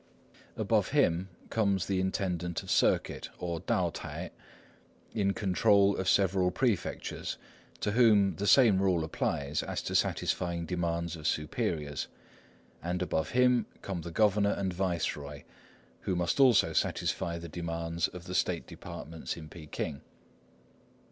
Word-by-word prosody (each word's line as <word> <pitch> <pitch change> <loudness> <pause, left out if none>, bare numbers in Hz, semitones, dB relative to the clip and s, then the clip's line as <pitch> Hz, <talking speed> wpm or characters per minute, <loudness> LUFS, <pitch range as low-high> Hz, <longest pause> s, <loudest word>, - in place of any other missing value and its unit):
Above - - +2
him 85 +3 +2 0.2
comes 100 -4 +1
the 95 -2 0
intendant 90 -3 -2
of - - -5
circuit, - - +2
or 85 -2 -3
Tao - - 0
t'ai, - - -6 0.8
in 100 -2 +1
control 100 0 +3
of 95 0 0
several 95 -1 +3
prefectures, 105 +1 -2 0.4
to 105 - 0
whom 105 -4 +5
the 100 - -2
same 105 -4 +6
rule 90 -4 +2
applies 70 -2 -1
as - - -3
to - - -4
satisfying 85 -2 0
demands 85 -1 -2
of 80 -2 -4
superiors; 75 -1 -1 0.7
and 90 +1 -1
above 80 -4 -1
him 125 -2 +4 0.2
come 95 -3 -3
the 85 - -6
governor 100 +3 +3
and 95 -2 -1
viceroy, 85 -6 -2 0.6
who 95 - -2
must 85 +7 0
also 125 -8 +5
satisfy 85 0 0
the 85 0 -7
demands 85 0 -2
of 90 -1 -10
the 90 +1 -7
state 90 -2 0
departments 80 +1 -7
in 80 -2 -9
Peking. 75 -3 -5
90 Hz, 135 wpm, -30 LUFS, 85-100 Hz, 0.8 s, same